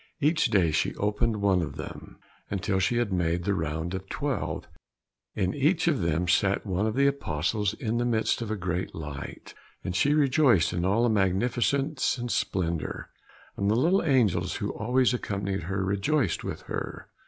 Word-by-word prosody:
Each 155 +2 +2
day 90 -6 +3
she - - 0
opened 105 +1 0
one 95 -3 +3
of 80 - -4
them, - - -8 0.3
until 95 -1 -1
she 95 +6 +1
had 120 -5 0
made 85 -1 0
the 100 +3 +1
round 80 0 -2
of 95 - -2
the 95 - -26
twelve. 145 +2 -3 0.7
In 95 -2 0
each 155 +5 +2
of 145 - +2
them 85 +1 0
sat 100 +4 +2
one 100 +2 0
of 110 - -2
the 140 +1 +3
Apostles 105 - 0
in 115 +1 -2
the 120 - +1
midst 115 0 +1
of 115 - -4
a 110 - -1
great 90 -1 -3
light, 75 -4 -7 0.3
and 90 - -3
she 145 +7 +3
rejoiced 135 - +4
in 85 0 -1
all 100 +5 +2
the 120 - +3
magnificence 120 - +1
and 120 -1 -3
splendour, 85 -4 -2 0.4
and 100 0 0
the 110 - +3
little 170 - +3
angels 105 - +2
who 100 - -2
always 125 +3 +2
accompanied 100 -6 -2
her 95 +1 -1
rejoiced 110 +10 0
with - - -5
her. - - -5
100 Hz, 180 wpm, -27 LUFS, 90-125 Hz, 0.7 s, rejoiced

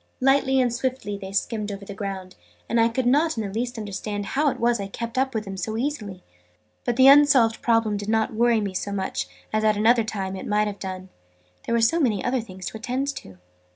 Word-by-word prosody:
Lightly 270 0 +3
and 245 -2 +2
swiftly 245 -4 -2
they 195 -1 -7
skimmed 210 +1 -2
over 200 0 -7
the 200 - -7
ground, 190 -2 -6 0.3
and 230 0 +2
I 230 - +4
could 245 +2 -2
not 295 +4 +2
in 220 - -1
the 195 - -6
least 245 +2 -3
understand 205 -1 -4
how 290 +7 +1
it - - -5
was 235 -1 +2
I 200 - -3
kept 230 +4 -6
up 265 -1 0
with 215 -1 -2
them 195 -1 -6
so 215 +4 -3
easily. 220 -9 -4 0.6
But 245 - 0
the 260 +2 +5
unsolved 275 -5 +6
problem 225 -3 +2
did 205 +1 -5
not 220 0 +1
worry 230 0 +3
me 200 -2 -3
so 200 +2 -3
much 190 - -2 0.3
as 215 0 +1
at 215 -1 +3
another 230 +2 +4
time 195 -3 -4
it 190 - -7
might 210 0 +2
have 205 -1 -5
done, 185 -1 -6 0.6
there 235 - +1
were 230 - +2
so 325 +10 +3
many 225 - +1
other 250 0 +1
things 185 -4 -10
to - - -8
attend 255 +5 -2
to. 95 -1 -11
220 Hz, 230 wpm, -24 LUFS, 200-245 Hz, 0.6 s, unsolved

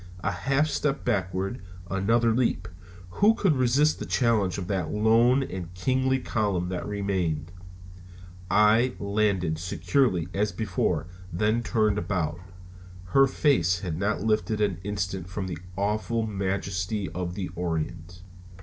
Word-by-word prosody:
A 100 - +1
half 135 +10 +1
step 145 -1 -1
backward, 95 +4 -1 0.3
another 115 +5 +2
leap 125 +1 0 0.5
who 215 +2 +6
could 185 -9 +2
resist 135 +4 +3
the - - -4
challenge 110 -8 +1
of 95 - -4
that 90 -4 -2
lone 115 - +4
and 90 -7 -6
kingly 130 +7 +1
column 100 -8 -1
that 90 - -4
remained? 95 -6 -2 1.0
I 110 +5 +4
landed 100 -6 0
securely 90 - +1
as 105 +1 0
before, 110 -6 -1 0.3
then 105 +7 +1
turned 110 -3 +1
about. 85 -6 -2 0.7
Her 135 +7 +5
face 90 - +2
had 85 -5 -3
not 100 +6 -1
lifted 110 0 0
an 100 -5 0
instant 95 -3 -3
from 95 +1 -4
the 90 -4 -5 0.2
awful 110 +3 0
majesty 95 -1 -2
of 90 0 -4
the 95 -3 -4
Orient. 85 +1 -4
100 Hz, 130 wpm, -26 LUFS, 90-115 Hz, 1.0 s, who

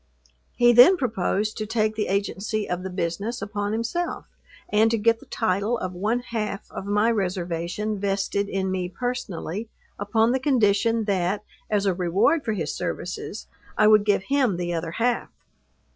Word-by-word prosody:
He 240 0 +5
then 255 +11 +8
proposed 215 - -1
to 215 - -3
take 215 -1 +1
the 215 -1 -2
agency 200 +2 -1
of 180 0 -2
the 190 - -5
business 185 +6 -3
upon 205 0 -3
himself, 235 +11 -2 0.4
and 220 +2 +3
to 230 - +1
get 230 +1 +2
the - - -17
title 215 +2 0
of 185 -3 -4
one 215 +7 0
half 215 -4 -4
of 195 - -6
my 210 +3 +3
reservation 185 +1 -2
vested 200 0 -1
in 190 -1 -1
me 180 -1 -2
personally, 225 -3 -4 0.3
upon 220 +3 +2
the 260 - +1
condition 230 -4 +2
that, 195 0 0 0.3
as 205 -2 +1
a 195 - +3
reward 190 - +2
for 220 - -1
his 165 -7 -3
services, - - -5 0.3
I 215 - +5
would 215 -1 +6
give 205 -2 +2
him 260 -6 +1
the 175 0 -2
other 165 0 -3
half. 240 +3 0
210 Hz, 165 wpm, -24 LUFS, 190-230 Hz, 0.4 s, then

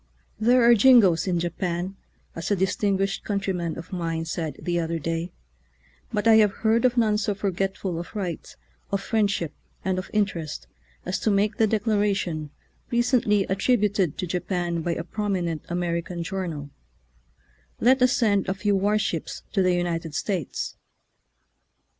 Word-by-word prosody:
There 240 +3 +4
are 235 0 +7
jingoes 210 -7 +6
in 175 -2 +1
Japan, 175 +2 -2 0.4
as 165 - -4
a 205 - +3
distinguished 195 +1 0
countryman 190 -5 -2
of 165 +3 -9
mine 165 -2 -2
said 160 -1 -3
the 175 -1 -1
other 165 0 -1
day, 165 +2 -3 0.8
but 210 -1 0
I 225 -1 +8
have 210 -2 +5
heard 230 +2 +4
of 250 0 +2
none 215 -3 +3
so 205 -1 -1
forgetful 195 -2 -2
of 175 - -8
right, 180 -6 -4 0.4
of 200 - +1
friendship, 200 -7 0 0.3
and 185 -1 0
of 185 - -7
interest 190 -8 -1 0.4
as 180 - -2
to - - 0
make 205 +1 +1
the 220 - +4
declaration, 205 -7 0 0.4
re 240 0 +2
cently 210 -5 +2
attributed 200 - +1
to - - -2
Japan 175 -1 -2
by 170 +1 -1
a 165 - -3
prominent 180 -5 -2
American 170 0 -2
journal, 165 -6 -4 1.1
"let 255 +2 +4
us 250 +1 +5
send 205 -7 +2
a 190 - 0
few 205 +1 +1
war 205 +2 +2
ships 185 -6 -3
to 195 - +2
the 185 -1 +3
United 165 -3 -2
States." 185 - -3
190 Hz, 155 wpm, -25 LUFS, 170-210 Hz, 1.1 s, I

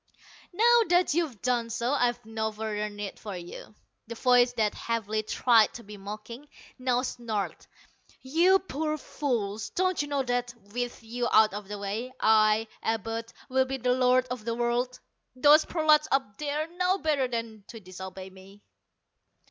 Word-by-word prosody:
"Now 470 +5 +5
that 355 -3 +3
you've 310 - -2
done 240 -2 0
so, 240 +2 -1
I've 245 -4 0
no 220 0 -2
further 210 -1 -3
need 205 -1 -7
for 205 -4 -6
you." 175 +4 -10 0.3
The 230 - -6
voice 245 0 +4
that 220 -3 +1
heavily 220 -2 -2
tried 225 0 +3
to 235 - -8
be 210 +1 -10
mocking, 215 +7 -9 0.3
now 250 -1 +1
snarled. 225 -6 -4 0.6
"You 340 +8 +4
poor 310 -4 -3
fools, 220 -9 -3
don't 370 -2 0
you 290 - -4
know 285 -2 0
that 245 -1 -2 0.2
with 245 -1 -4
you 240 +2 -2
out 215 -1 +5
of 205 -1 -6
the 205 +1 -5
way, 205 +5 -4
I, 215 0 +4
Abud, 225 +1 -3 0.2
will 260 0 +2
be 265 +1 -3
the 250 0 +1
Lord 255 0 +3
of 250 -3 -4
the 230 +1 -2
World. 240 +1 -1 0.4
Those 295 +4 +6
prolats 310 -2 +3
up 265 -7 0
there 300 +1 -1
know 360 +2 0
better 300 -7 +1
than 230 -3 -5
to 225 - -10
disobey 190 0 -9
me." 195 +2 -16
240 Hz, 165 wpm, -28 LUFS, 215-270 Hz, 0.6 s, Those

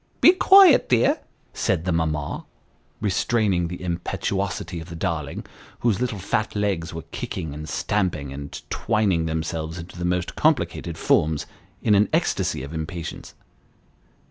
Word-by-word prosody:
" - - -37
Be - - +9
quiet, 380 -3 +7
dear," 120 -2 +3 0.3
said 85 -3 0
the 90 - +1
mamma, 80 -3 -1 0.6
restraining 100 -3 +1
the 90 +2 -7
impetuosity 85 -1 -2
of 80 +2 -9
the 85 - -7
darling, 80 -5 -3 0.4
whose 115 -2 +1
little 125 -4 -1
fat 100 +3 -1
legs 95 -5 -1
were 80 -2 -6
kicking, 80 -6 -4
and 75 +1 -7
stamping, 80 -2 -1
and 70 +1 -7
twining 100 -7 +1
themselves 80 0 -3
into 85 +1 -9
the - - -3
most 90 0 -1
complicated 85 -1 +1
forms, 80 -1 +2 0.4
in 105 - +4
an 100 0 +4
ecstasy - - 0
of 70 +4 -8
impatience. 80 +1 -6
85 Hz, 145 wpm, -24 LUFS, 80-100 Hz, 0.6 s, Be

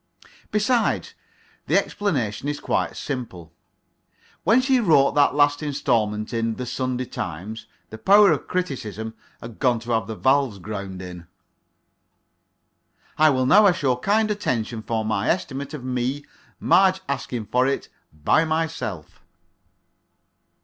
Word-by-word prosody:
Besides, 225 +3 +1 0.5
the - - +3
explanation 140 - -1
is 145 - -3
quite - - -1
simple. 95 - -6 0.9
When 225 +7 +5
she 260 0 +2
wrote 155 - +4
that 145 -1 +3
last 145 0 +3
instalment 115 -8 -1
in 115 -1 -1
"The 125 - -5
Sunday 130 0 -2
Times," 95 +4 -6 0.2
the 110 - -8
power 200 - +6
of - - -1
criticism 110 - -4 0.3
had 115 -1 -10
gone 125 -4 +2
to 120 +1 -6
have 110 -2 0
the 110 - -5
valves 130 +2 +2
ground 100 -1 -6
in. 90 -2 -9 1.9
I 155 0 +6
will 130 -2 +1
now 205 +10 +6
ask 180 -3 +1
your 125 -2 +1
kind 215 +7 +1
attention 120 - -2
for 110 0 -2
my 110 -2 -1
estimate 140 -6 -2
of 135 - -8
me, 130 +3 -2 0.3
Marge 190 0 +4
Askinforit, 125 0 -1 0.2
by 75 - +2
myself. 160 - -3
130 Hz, 130 wpm, -23 LUFS, 110-155 Hz, 1.9 s, power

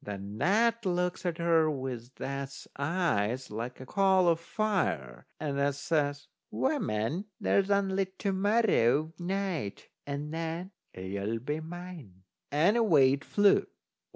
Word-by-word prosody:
Then 100 +1 -6
that 230 +4 +3
looks 180 -1 -1
at 170 -2 -1
her 165 -2 +3
with 130 -3 -5
that's 135 0 -5
eyes 135 - 0
like 115 +4 -5
a 130 - -8
coal 190 +1 +3
o' 165 - +4
fire, 165 - -2
and 145 -3 -2
that 140 0 +1
says: 145 -1 -1 0.2
"Woman, 115 - -1
there's 200 0 +2
only 195 -1 +2
to 200 - -1
morrow 190 - +2
night, 180 - -3 0.2
and 145 +2 -4
then 165 +3 -4 0.2
you'll 100 +4 -3
be 145 +7 -3
mine!" 160 - -9 0.3
And 170 +10 +3
away 150 - +5
it 140 +2 -3
flew. 205 -1 +3
155 Hz, 130 wpm, -30 LUFS, 130-190 Hz, 0.3 s, away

